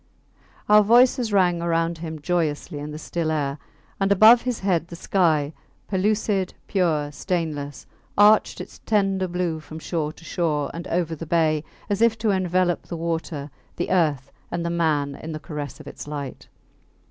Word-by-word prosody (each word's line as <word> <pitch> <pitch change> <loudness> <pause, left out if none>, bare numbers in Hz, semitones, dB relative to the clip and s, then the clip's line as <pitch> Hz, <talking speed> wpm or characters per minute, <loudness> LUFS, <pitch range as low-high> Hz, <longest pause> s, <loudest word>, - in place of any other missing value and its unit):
Our 210 0 +7
voices 240 +1 +4
rang 180 -4 +3
around 165 0 0
him 160 -1 -6
joyously 155 -2 -1
in 145 +1 -6
the 150 - -6
still 165 0 -3
air, 145 -2 -1 0.4
and 195 0 +1
above 220 +4 +8
his 250 -3 -3
head 175 -4 +1
the 170 - -9
sky, 160 -5 +1 0.3
pellucid, 200 -1 0
pure, 160 -6 0
stainless, 150 -3 -3 0.3
arched 210 +1 +5
its - - -9
tender 195 -3 +2
blue 175 -2 -2
from 155 0 -10
shore 160 -2 -2
to 165 - -17
shore 155 -6 -1
and 170 +1 -6
over 170 -1 -1
the 165 +1 -8
bay, 155 -2 +2 0.2
as 205 +1 -1
if 230 -1 +4
to 215 -1 +1
envelop 185 -2 +1
the 170 - -5
water, 160 -3 -3 0.2
the 175 - -3
earth, 150 -7 +1 0.2
and 170 0 -3
the 170 - -1
man 155 -4 +1
in 160 0 -7
the 155 - -5
caress 150 -1 -6
of 150 - -11
its 140 - -9
light. 145 -3 -6
170 Hz, 170 wpm, -24 LUFS, 155-190 Hz, 0.4 s, above